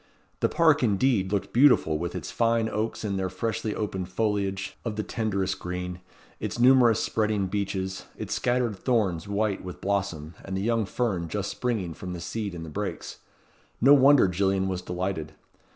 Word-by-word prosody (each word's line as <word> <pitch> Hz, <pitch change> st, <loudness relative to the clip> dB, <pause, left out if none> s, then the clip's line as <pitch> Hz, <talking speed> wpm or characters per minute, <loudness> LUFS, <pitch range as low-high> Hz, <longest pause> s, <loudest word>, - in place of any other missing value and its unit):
The -, -, +2 dB
park, 160 Hz, -3 st, +4 dB
indeed, 105 Hz, -3 st, +2 dB
looked 100 Hz, -2 st, -2 dB
beautiful 120 Hz, -, +5 dB
with 85 Hz, +1 st, -4 dB
its -, -, -5 dB
fine 115 Hz, -1 st, +2 dB
oaks 110 Hz, +1 st, -3 dB
in 100 Hz, -2 st, -1 dB
their 95 Hz, -1 st, -1 dB
freshly 110 Hz, +3 st, -2 dB
opened 95 Hz, -4 st, -3 dB
foliage 100 Hz, -1 st, -1 dB
of 115 Hz, -3 st, -3 dB
the 105 Hz, -, -2 dB
tenderest 100 Hz, -5 st, -2 dB
green, 90 Hz, 0 st, -5 dB, 0.4 s
its -, -, -4 dB
numerous 120 Hz, -2 st, +5 dB
spreading 105 Hz, -3 st, 0 dB
beeches, 95 Hz, -1 st, -3 dB
its -, -, -4 dB
scattered 120 Hz, -3 st, 0 dB
thorns 100 Hz, -7 st, 0 dB
white 100 Hz, 0 st, -1 dB
with 90 Hz, -1 st, -8 dB
blossom, 90 Hz, -5 st, -2 dB
and 95 Hz, -, -4 dB
the -, -, -2 dB
young 115 Hz, -2 st, +1 dB
fern 95 Hz, -6 st, -1 dB
just 105 Hz, +3 st, -3 dB
springing 110 Hz, -9 st, -2 dB
from 90 Hz, +2 st, -7 dB
the 90 Hz, -, -5 dB
seed 100 Hz, +2 st, -4 dB
in 80 Hz, -, -6 dB
the -, -, -8 dB
brakes. -, -, -5 dB, 0.6 s
No 135 Hz, +4 st, +7 dB
wonder 140 Hz, -4 st, +6 dB
Gillian 95 Hz, +1 st, +1 dB
was 95 Hz, -1 st, -2 dB
delighted. 90 Hz, -3 st, -3 dB
100 Hz, 170 wpm, -26 LUFS, 95-115 Hz, 0.6 s, No